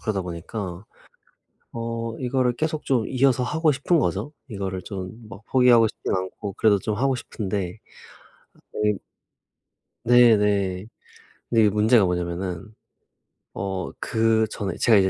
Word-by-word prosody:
그러다 100 -4 -2
보니까 90 +2 -6 0.9
어 115 0 -4
이거를 125 -1 +1
계속 155 +2 -2
좀 120 -5 +1
이어서 130 -1 +2
하고 155 +4 +2
싶은 150 +5 +1
거죠. 150 - -1 0.2
이거를 95 -3 -4
좀 95 -2 -6 0.2
막 115 0 -11
포기하고 125 -3 +5
싶진 - - -4
않고 95 +2 -4
그래도 105 -2 +3
좀 105 +2 -2
하고 135 +1 +1
싶은데. 100 -5 -4 0.9
어이 105 -1 +1 1.1
네 120 -2 +6
네. 100 -2 0 0.7
근데 115 - +4
이게 105 - +5
문제가 105 +1 +4
뭐냐하면은 90 0 -3 0.9
어 95 -1 -4
그 110 -1 +2
전에 100 -3 -4
제가 115 -3 +5
이제 95 -1 +4
110 Hz, 270 characters per minute, -24 LUFS, 95-120 Hz, 1.1 s, 네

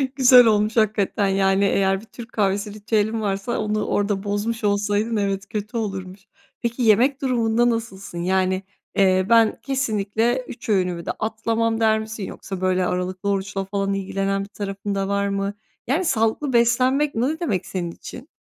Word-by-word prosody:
Güzel 250 -2 +7
olmuş 215 0 +2
hakikaten. 210 -2 +2
Yani, 195 0 +2
eğer 195 0 +1
bir - - -14
Türk 230 0 -11
kahvesi 200 0 0
ritüelin 220 +1 0
varsa 200 +3 -2
onu 215 0 -1
orada 205 -1 0
bozmuş 210 +2 -2
olsaydın, 205 +2 +1
evet, 200 0 -1
kötü 210 +2 -4
olurmuş. 195 -3 -4 0.4
Peki, 235 +2 -2
yemek 240 +5 +4
durumunda 240 -2 +2
nasılsın? 205 -6 -4
Yani, 185 +1 0 0.3
eee, 185 -1 +3
"Ben 230 -1 +4
kesinlikle 240 -2 0
3 235 - -9
öğünümü 180 -4 0
de - - -1
atlamam." 225 +1 -1
der 220 -1 +3
misin? 220 -1 -6
Yoksa, 190 -1 -7
böyle, 185 -1 +1
aralıklı 180 +2 -2
oruçla 195 0 -2
falan 195 0 -1
ilgilenen 195 0 -1
bir 200 - -10
tarafın 200 0 -4
da 195 0 -1
var 200 0 0
mı? 200 0 -2 0.3
Yani, 310 +9 +1
sağlıklı 250 +1 0
beslenmek 255 +4 +3
ne 270 +8 0
demek 210 - -1
senin 175 -3 -4
için? 250 - -11
205 Hz, 160 wpm, -22 LUFS, 195-230 Hz, 0.4 s, Güzel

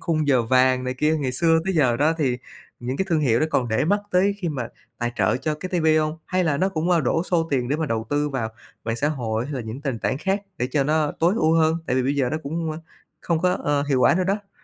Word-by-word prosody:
khung 155 -3 -1
giờ 130 -4 +4
vàng 130 +2 +3
này 125 0 -2
kia, 155 +4 +1
ngày 135 -4 -2
xưa 165 +4 +3
tới 190 -1 -1
giờ 130 -7 +3
đó, 155 +3 +3
thì 125 -4 0 0.4
những 125 +2 -3
cái 190 - 0
thương 160 -3 +2
hiệu 120 -5 +2
đó 155 - +2
còn 125 -5 +1
để 110 +6 +1
mắt 205 +5 +2
tới 195 +2 +3
khi 175 -4 -2
mà 125 -6 -3 0.3
tài 120 0 -2
trợ 105 +3 +2
cho 150 +3 -2
cái 185 +5 -6
TV 160 - 0
hông? 155 +1 -1
Hay 185 -1 0
là 150 -3 +1
nó 190 +4 +1
cũng, 170 -1 -2
à, 170 - +4
đổ 160 +4 +1
xô 165 -3 0
tiền 125 -3 0
để 145 - +1
mà 160 -1 -2
đầu 115 -2 -2
tư 145 0 +1
vào 125 -5 -2 0.4
mạng 115 0 -2
xã 145 - +1
hội 115 -5 -2
hay 145 - -5
là 130 - -3
những 110 +4 -7
nền 135 -6 -3
tảng 130 - -1
khác 195 +3 -1 0.2
để 125 - -1
cho 140 -2 +2
nó 155 0 +1
tối 175 +5 +3
ưu 160 -3 +3
hơn, 160 0 +3
tại 125 - 0
vì 130 - +2
bây 135 +3 0
giờ 130 -3 +1
nó 155 - -1
cũng, 160 +2 -3
a, - - -6 0.4
không 170 -2 0
có, 180 0 +2
ơ, 145 -5 0
hiệu 140 -3 0
quả 125 - +5
nữa 185 +1 +1
đó? 200 +1 -2
150 Hz, 285 wpm, -23 LUFS, 125-165 Hz, 0.4 s, quả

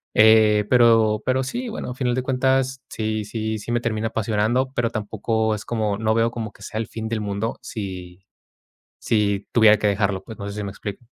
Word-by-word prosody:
eh, 110 -1 +6
pero 115 -3 +4
pero 130 +1 +1
sí, 240 - -4
bueno, 215 - -5
al 125 - -6
final 125 -2 0
de 130 - 0
cuentas, 130 0 +1
sí 110 -1 -2
sí 110 +1 -3
sí 105 - -6
me 120 - +2
termina 110 -1 -1
apasionando, 115 +4 0
pero 120 -1 0
tampoco 110 +1 -1
es 105 - -8
como 110 -3 -1
no 110 0 +1
veo 115 +1 +2
como 110 -3 -5
que - - -21
sea 110 - -5
el 115 - -3
fin 110 -1 -5
del 115 -1 -1
mundo 105 +2 -3
si 95 -3 -7 0.8
si 100 -3 0
tuviera 110 -2 +6
que 105 - +1
dejarlo, 100 -1 0
pues, 110 - -11
no 100 - -5
sé 100 - -7
si 105 - -3
me 100 - -4
explico. 100 +4 -7
110 Hz, 210 wpm, -22 LUFS, 105-120 Hz, 0.8 s, eh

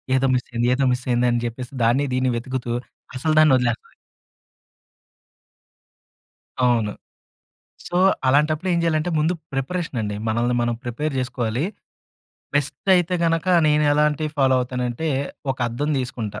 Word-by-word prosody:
ఏదో 135 +1 +2
మిస్ 125 - -2
అయ్యింది, 120 0 0
ఏదో 135 +1 +1
మిస్ 125 0 -4
అయింది 120 0 +2
అని 120 0 0
చెప్పేసి 125 +3 -6
దాన్ని, 120 +5 +3
దీన్ని 130 0 +1
వెతుకుతూ 125 0 -4 0.5
అసలు 155 +4 0
దాన్ని 155 -3 +6
వదిలేస్తది. 120 -2 -2 2.7
అవును. 115 -4 +2 1.0
సో, - - -7 0.3
అలాంటప్పుడేం 155 +6 +2
చేయాలంటే, 165 0 +1
ముందు 160 +4 +2 0.2
ప్రిపరేషనండి, 135 - -3
మనల్ని 120 +2 +1
మనం 120 0 0
ప్రిపేర్ 140 +5 -3
చేసుకోవాలి. 125 0 -2 0.9
బెస్టయితే 175 +5 +2
గనక, 165 +1 +1 0.2
నేను 150 0 +3
ఎలాంటివి 150 +1 +1
ఫాలో 130 -1 +4
అవుతానంటే, 125 +4 -3 0.4
ఒక 130 - -14
అద్దం 145 +6 -2
తీసుకుంటా. 120 -5 -4
130 Hz, 120 wpm, -22 LUFS, 120-155 Hz, 2.7 s, దాన్ని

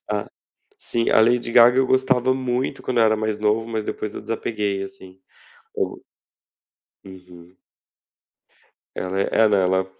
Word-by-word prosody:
Ah, 105 -1 -2 0.5
sim, 115 -1 -1
a - - +5
Lady 120 +1 +2
Gaga. 120 +1 +6
Eu 130 - +3
gostava 130 -1 +2
muito 130 +1 -3
quando 125 -2 -2
eu - - +5
era 110 0 +3
mais 110 0 -2
novo, 105 +1 0
mas 110 -2 -4
depois 105 - -5
eu - - -6
desapeguei 105 -3 -3
assim, 95 -1 -12 0.6
eu - - -3 1.0
Uhum. 90 -1 -15 1.4
Ela 95 +1 -3
é - - -2
ela 110 -2 +4
ela, 95 -1 +2
ela 95 - -2
110 Hz, 150 wpm, -22 LUFS, 95-120 Hz, 1.4 s, Gaga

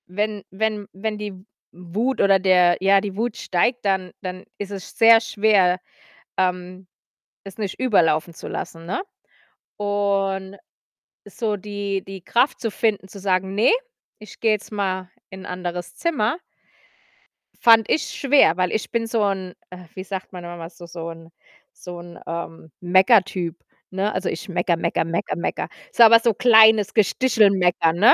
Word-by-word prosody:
Wenn 205 +1 -3
wenn 210 +1 -2
wenn 210 +2 -4
die 210 -1 -6
W 185 +1 -16 0.5
Wut 245 +5 0
oder 195 -1 +4
der 180 -2 +4
ja, 195 +1 +5
die 200 -2 -5
Wut 235 +2 -2
steigt, 235 +7 0
dann 190 -2 0
dann 185 0 -6
is 205 -1 -6
es 195 -2 -9
sehr 225 0 +7
schwer, 200 -5 +2 0.6
ähm, 185 0 -2 0.6
es 195 0 -11
nicht 205 -3 -4
überlaufen 170 -9 +2
zu - - -10
lassen, 165 0 -6
ne, 185 - -2 0.8
und 200 -1 -1 0.7
so 220 -4 -3
die 200 -1 -4
die 195 -1 -9
Kraft 245 +9 +1
zu 225 - -2
finden, 205 -3 -1
zu 200 - -11
sagen: 190 0 0
„Ne, 210 - +4 0.5
ich 215 -1 -14
gehe 225 -1 +3
jetzt 210 +1 -4
mal 190 -3 -3 0.2
in 190 0 -10
'n - - -9
anderes 175 -1 -5
Zimmer“ 260 - -1 1.2
fand 225 -2 +5
ich 315 - +2
schwer, 275 - +3
weil 180 -1 0
ich 220 - -3
bin 230 -1 -1
so 225 -1 0
'n 190 -2 -2 0.2
äh, 180 0 -11
wie 185 - -7
sagt 190 -1 -6
man 180 -1 -8
immer 175 -1 -8
so 175 -1 -13
so 170 -1 -7
'n 165 0 -12 0.4
so 175 -1 -9
'n, 170 0 -12
ähm, 165 -1 -7
Mecker-Typ, 185 -1 +3 0.4
ne? 195 +3 -1
Also, 185 -1 -2
ich - - -6
meckere, 175 -1 0
meckere, 170 0 -1
meckere, 165 +1 -2
meckere. 170 - -3 0.2
So 235 - +6
aber 230 0 +8
so 230 0 +1
kleines 220 -3 +5
Gestichel-Meckern, 195 -7 +3
ne? 205 +6 +7
195 Hz, 160 wpm, -22 LUFS, 180-215 Hz, 1.2 s, aber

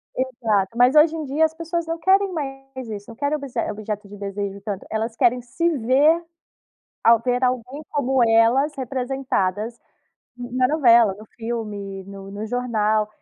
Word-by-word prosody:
Exato! 230 -5 -1
Mas, 250 +3 +5
hoje 310 +2 +6
em 315 - -4
dia, 290 +4 +2
as 315 - -2
pessoas 335 +1 -3
não 330 0 -3
querem 385 +3 +3
mais 270 -4 -6
isso, 205 0 -7
não 230 - -10
querem 285 +3 -1
obse 265 -4 -5
objeto 210 0 -5
de 205 +1 -11
desejo 200 0 -4
tanto, 200 -2 -5
elas 225 +1 -2
querem 245 +1 +2
se 270 +8 -1
ver 280 +8 +3 0.8
ao 230 0 +6
ver 250 +1 0
alguém 255 +3 -1
como 265 -3 +1
elas 235 +6 +4
representadas 250 -5 -2 0.6
na 250 +1 0
novela, 235 -9 +5
no 215 - -11
filme, 210 -4 -5
no 195 0 -10
no 205 +2 -5
jornal. 220 -3 0
245 Hz, 160 wpm, -22 LUFS, 215-275 Hz, 0.8 s, hoje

